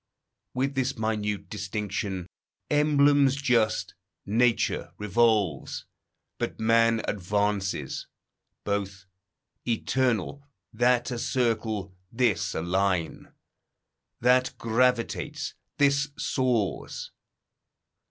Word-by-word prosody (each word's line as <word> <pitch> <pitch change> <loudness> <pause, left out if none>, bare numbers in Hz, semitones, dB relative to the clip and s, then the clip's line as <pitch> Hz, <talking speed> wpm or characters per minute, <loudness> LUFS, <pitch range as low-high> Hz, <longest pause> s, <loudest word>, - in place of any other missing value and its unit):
With 135 +2 0
this 130 -1 -1
minute 105 -2 -2
distinction, 100 -3 -3 0.5
emblems 145 -2 +4
just, 125 -6 +1 0.3
Nature 115 +3 +1
revolves, 105 - +1 0.5
but - - -3
man 115 0 +3
advances; 100 0 -1 0.6
both 100 -2 -3 0.6
Eternal, 125 +2 0 0.3
that 120 +2 +2
a 120 - -3
circle, 110 -6 -1 0.2
this 105 -8 +1
a 80 - -2
line. 90 -1 -1 0.9
That 125 +1 +3
gravitates, 115 +1 0 0.2
this 140 0 +3
soars. 125 -6 -1
115 Hz, 75 wpm, -27 LUFS, 100-125 Hz, 0.9 s, emblems